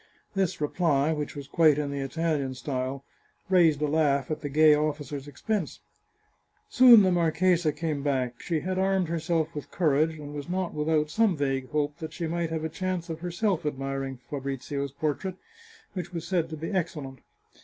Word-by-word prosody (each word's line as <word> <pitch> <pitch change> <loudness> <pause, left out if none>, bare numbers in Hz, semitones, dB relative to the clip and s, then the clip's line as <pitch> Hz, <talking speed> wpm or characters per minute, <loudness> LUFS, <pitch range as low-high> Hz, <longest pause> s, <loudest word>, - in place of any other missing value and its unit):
This 195 -4 0
reply, 150 -1 +1
which 150 -1 -4
was 140 -2 -7
quite 155 0 +4
in 145 -1 -2
the 140 - -3
Italian 140 -1 -1
style, 130 0 -3 0.5
raised 165 -5 +4
a - - +2
laugh 145 -2 +1
at 155 - -3
the 145 - -4
gay 155 +2 +6
officer's 145 -2 -2
expense. 175 +5 -3 0.9
Soon 245 -4 +8
the 185 - +3
marchesa 175 -1 +2
came 150 -1 -3
back; 130 -4 -1
she 165 -3 -1
had 185 +1 -2
armed 190 -2 +1
herself 165 -1 -1
with 150 - -7
courage, 155 -1 +1
and 145 -1 -8
was 145 +2 -6
not 185 -1 -2
without 150 0 0
some 220 -5 +2
vague 135 -2 -1
hope 150 -1 -1
that 160 - -6
she 170 - -3
might 170 0 -1
have 160 -1 -3
a - - 0
chance 180 0 -3
of 160 - -5
herself 180 +1 -1
admiring 135 -2 -3
Fabrizio's 140 0 -4
portrait, 155 +6 -2 0.6
which 180 -2 -5
was 170 -1 -5
said 175 -3 0
to 160 - -6
be 165 +5 -5
excellent. 150 - -3
155 Hz, 175 wpm, -27 LUFS, 140-170 Hz, 0.9 s, Soon